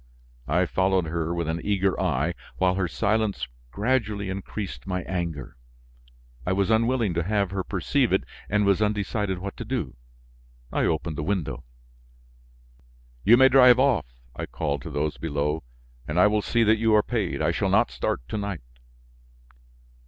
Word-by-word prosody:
I 90 +5 +2
followed 95 0 +1
her 80 +1 -2
with 85 -2 -2
an 80 +1 -2
eager 100 -2 +1
eye, 85 -2 0 0.2
while 90 -1 +3
her 95 -1 0
silence 105 -7 0 0.2
gradually 105 - -1
increased 95 0 -6
my 90 -1 -2
anger. 85 -8 -4 0.9
I 90 - 0
was 100 +2 +1
unwilling 115 -2 +2
to 85 - 0
have 100 0 0
her 95 -1 -2
perceive - - 0
it - - +2 0.3
and 105 0 +2
was 100 +1 +3
undecided 105 -2 0
what 100 +2 -6
to - - -5
do. 105 - -3 0.8
I - - +1
opened 80 -1 -1
the - - -2
window. 75 -10 -2 1.6
"You 115 +4 +7
may 130 +1 +7
drive 125 -1 +7
off," 130 - +2 0.3
I - - -5
called 70 -3 -2
to - - -7
those 75 +1 -2
below, 75 0 -1 0.5
"and 75 +4 0
I 90 - +7
will 105 0 +3
see 115 +2 +1
that 110 0 +4
you 110 -1 +3
are 105 - +5
paid. - - -2
I - - +2
shall - - 0
not - - +3
start - - -3
to 110 - -2
night." 100 -9 -4
95 Hz, 165 wpm, -25 LUFS, 85-105 Hz, 1.6 s, You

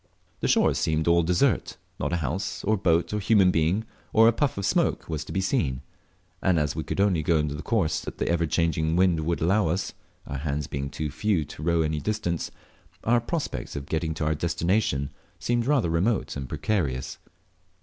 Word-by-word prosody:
The - - 0
shores - - +3
seemed 80 0 0
all 85 0 +5
desert; 85 +1 +1 0.2
not - - -1
a - - +1
house, 80 +5 -3
or 110 +2 +2
boat, 85 -1 +1
or 105 - 0
human 100 -2 +4
being, 85 +7 +1 0.3
or 115 0 +7
a - - +7
puff 140 -1 0
of 100 - -2
smoke - - +1
was 80 -2 -3
to - - -9
be 95 - 0
seen; 65 -9 0 0.6
and 90 -3 +3
as 75 -1 0
we 80 - -2
could 80 - -4
only 100 -5 +3
go 80 +1 +2
on 75 -1 0
the 75 0 -5
course 90 -10 +1
that - - -7
the - - -1
ever 85 -1 +1
changing 80 0 +1
wind 90 -2 +3
would 85 +2 -1
allow 95 +3 +3
us 90 +4 -1 0.3
(our 70 -2 -5
hands 75 0 -2
being 70 -1 -4
too 75 0 -4
few 80 +1 0
to 75 - -11
row 85 +1 +2
any 75 0 -1
distance), 105 -4 -2 0.5
our 120 +1 +3
prospects 155 +6 -4
of 70 -1 -4
getting 80 +1 -2
to 80 - -2
our 80 - +2
destination 85 -2 0 0.3
seemed 120 0 0
rather 135 - +2
remote 95 +6 0
and 70 -2 -5
precarious. 75 -5 -2
85 Hz, 200 wpm, -26 LUFS, 75-100 Hz, 0.6 s, or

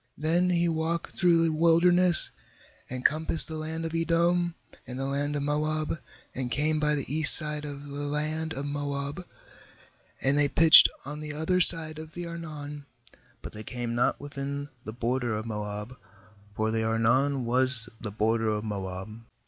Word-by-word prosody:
18Then 170 +4 +1
he 170 0 +1
walked 165 +1 -3
through 170 -3 +2
the 165 -1 0
wilderness, 170 +2 +4 0.6
and 125 0 -7
compassed 160 +2 +4
the 160 - -7
land 160 +1 -5
of 165 - -5
Edom, 170 +1 0 0.3
and 125 - -7
the 135 - -4
land 140 +2 -2
of 145 - -3
Moab, 155 +2 -2 0.3
and 130 -1 -5
came 155 +4 -1
by 150 0 0
the 140 -1 -5
east 155 -2 +10
side 150 -1 0
of 145 -1 -8
the 145 0 -8
land 155 +2 -3
of 140 -2 -5
Moab, 145 +2 -5 1.0
and 140 +2 0
they 145 - +3
pitched 160 +3 +7 0.2
on 145 +2 -7
the 150 -1 -7
other 160 +5 -1
side 160 -2 +6
of 160 0 -11
the 175 0 -6
Arnon, 150 -4 -9 0.6
but - - -9
they 105 - -9
came 120 +1 -6
not 120 +1 0
within 140 0 -7 0.2
the 110 - -6
border 120 0 -3
of 110 +1 -5
Moab, 105 +1 -6 0.6
for 110 +1 -2
the 110 0 -1
Arnon 120 +4 0
was 125 0 -1
the 110 - -6
border 110 +2 -1
of 105 0 -3
Moab. 100 +1 -7
145 Hz, 170 wpm, -26 LUFS, 125-160 Hz, 1.0 s, east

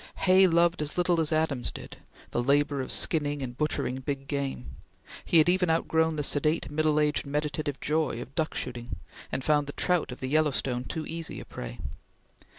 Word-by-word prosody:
Hay 190 0 +7
loved 170 -1 +3
as 150 +2 -3
little 175 -2 +3
as 155 - +2
Adams 155 -6 0
did, - - -10 0.3
the 120 - 0
labor 140 +2 +2
of 130 - -3
skinning 145 -3 0
and 125 -1 -5
butchering 130 -3 -1
big 135 +1 -4
game; 135 - -4 0.5
he 170 - +4
had 155 - +6
even 180 0 +3
outgrown 160 0 +2
the 150 - -1
sedate, 150 +2 +1
middle 155 0 +2
aged, 150 -1 +1
meditative 145 0 -2
joy 155 -5 0
of 125 +2 -8
duck 160 0 -1
shooting, 120 -4 -4 0.4
and 130 - -2
found 150 0 +2
the 145 - -6
trout 180 -6 0
of 125 - -8
the 130 - -3
Yellowstone 135 -4 +1
too 160 +3 -4
easy 165 -1 -5
a - - -9
prey. - - -7
150 Hz, 185 wpm, -28 LUFS, 135-160 Hz, 0.5 s, Hay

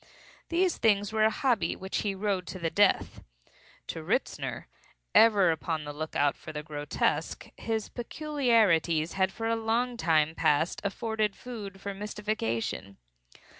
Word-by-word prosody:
These 355 +1 +1
things 205 -1 +2
were 215 0 +3
a - - +5
hobby 245 0 +1
which 190 +1 -4
he 200 -2 -1
rode 190 -2 -1
to - - -6
the 165 -2 -2
death. 200 +2 +2 0.6
To - - -5
Ritzner, - - -2 0.5
ever 205 -6 +6
upon 160 -1 -2
the 145 0 -6
lookout 145 -1 0
for - - -9
the 150 -1 -5
grotesque, 150 -1 -2
his 220 -2 -2
peculiarities 225 - +1
had 190 0 +1
for 225 +3 -5
a 230 - +2
long 235 +2 0
time 160 -6 +2
past 160 +1 +1
afforded 215 0 -1
food 210 -6 -8
for 200 +1 -5
mystification. 195 - -3
200 Hz, 140 wpm, -29 LUFS, 160-225 Hz, 0.6 s, ever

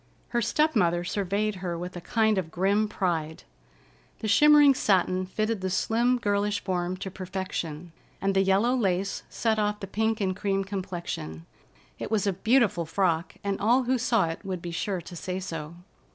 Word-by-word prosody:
Her 240 - 0
step 305 +6 +1
mother 175 -4 +2
surveyed 200 +2 -1
her 180 -2 -3
with 180 +2 -6
a 175 - -6
kind 220 +1 +2
of 170 -4 -4
grim 195 +5 +1
pride. 165 -6 -2 0.7
The 220 - -4
shimmering 295 +6 +7
satin 185 -5 +1
fitted 215 +1 -1
the 190 - -1
slim, 235 +6 +2
girlish 205 -2 0
form 180 -1 -2
to 190 0 -6
perfection, 180 -4 -5 0.3
and 195 0 0
the 195 - +3
yellow 195 +6 +3
lace 195 -4 0
set 220 -2 0
off 210 0 0
the - - -5
pink 220 +3 -1
and 190 -2 0
cream 195 0 0
complexion. 175 - -5 0.5
It - - -4
was 210 -2 +1
a 200 - +1
beautiful 210 -4 +2
frock, 170 -1 0
and 200 -1 -1
all 240 +5 +4
who 255 +1 +1
saw 230 -5 +2
it 165 - -6
would 190 -2 -4
be 170 0 -6
sure 185 +2 -2
to 175 - -10
say 180 +2 -4
so. 165 -3 -6
195 Hz, 180 wpm, -27 LUFS, 180-215 Hz, 0.7 s, shimmering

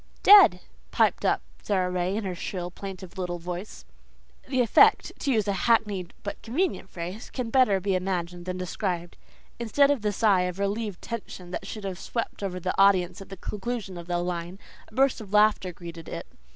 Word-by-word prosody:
"DEAD," 410 0 +8 0.3
piped - - +2
up - - +1 0.2
Sara 185 -3 0
Ray 180 +1 -1
in 220 - -2
her 190 -2 -3
shrill, 175 0 -5
plaintive 190 0 -8
little 175 -1 -2
voice. 175 +4 -7 0.6
The 260 -1 +1
effect, 235 - +5
to 275 - 0
use 215 -4 +1
a 200 - +1
hackneyed 205 -5 +1
but 200 -1 -5
convenient 275 - -1
phrase, 180 +5 -6
can 245 -3 -4
better 250 -7 +4
be 195 +1 -1
imagined 180 -2 -2
than 185 0 -3
described. 180 -1 -3 0.4
Instead 280 +5 +3
of 280 -5 0
the 210 0 0
sigh 205 -2 +3
of 180 0 -4
relieved 200 0 -2
tension 195 -5 -7
that 195 - -5
should 215 0 -7
have 190 -2 -4
swept 230 -3 -4
over 185 -2 -3
the 185 +1 -2
audience 195 0 +4
at 195 - -11
the 195 - -8
conclusion 210 0 -4
of 170 0 -8
the 175 -1 0
line, 175 +1 -3 0.3
a 215 - -18
burst 270 -2 +3
of 205 -2 -11
laughter 210 -3 +4
greeted 170 -1 -10
it. - - -5
195 Hz, 190 wpm, -26 LUFS, 180-220 Hz, 0.6 s, DEAD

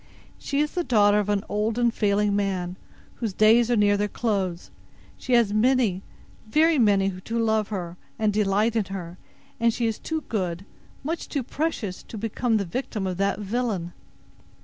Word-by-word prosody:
She 280 - -3
is 300 - 0
the 355 - -1
daughter 210 -6 +4
of 205 0 -2
an 205 -1 +1
old 210 +2 -1
and 240 -1 +2
failing 205 -1 +1
man, 185 -3 -1 0.4
whose 225 -5 -3
days 225 +4 +5
are 240 - +3
near 205 -1 +3
their 205 +1 0
close. 195 -5 -2 0.4
She 255 - -3
has 235 -4 +4
many, 220 -4 +2 0.5
very 310 +5 +3
many, 195 -4 +2
to 230 +4 -4
love 220 -2 +1
her, 180 -4 -5 0.2
and 215 -2 +1
delight 210 +2 +1
in 220 -3 +1
her; 180 -2 -7 0.4
and 230 0 +3
she 235 +1 -2
is 225 -1 -1
too 320 -1 -3
good, 185 - -3 0.4
much 325 +4 -4
too 280 -3 -2
precious, 260 - -3
to 225 - -10
become 225 +2 0
the 200 - -1
victim 215 +1 -3
of 185 -2 -3
that 200 +1 +1
villain." 205 -5 -2
210 Hz, 175 wpm, -25 LUFS, 195-235 Hz, 0.5 s, days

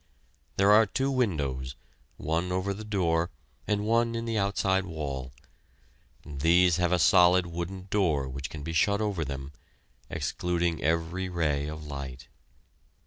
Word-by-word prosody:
There 100 +1 +5
are 110 +1 +6
two 135 +7 -1
windows, 70 - -1 0.4
one 85 +4 -1
over 95 +2 -1
the 105 +3 -8
door 85 -5 0 0.4
and 105 0 0
one 115 +1 +2
in 115 0 -3
the 115 -1 -2
outside 100 -2 +1
wall. 70 -6 -5 0.9
These 85 +4 +3
have 90 -1 +1
a 90 - +4
solid 90 +1 +5
wooden 85 +2 -5
door 80 -10 +1
which 65 +1 -5
can 75 -2 -8
be 80 +2 -4
shut 100 +5 +2
over 100 -6 -1
them, 70 -1 -6 0.6
excluding 85 -2 -1
every 85 +4 -1
ray 75 -5 0
of 75 0 -7
light. 70 -2 -7
85 Hz, 140 wpm, -28 LUFS, 75-100 Hz, 0.9 s, are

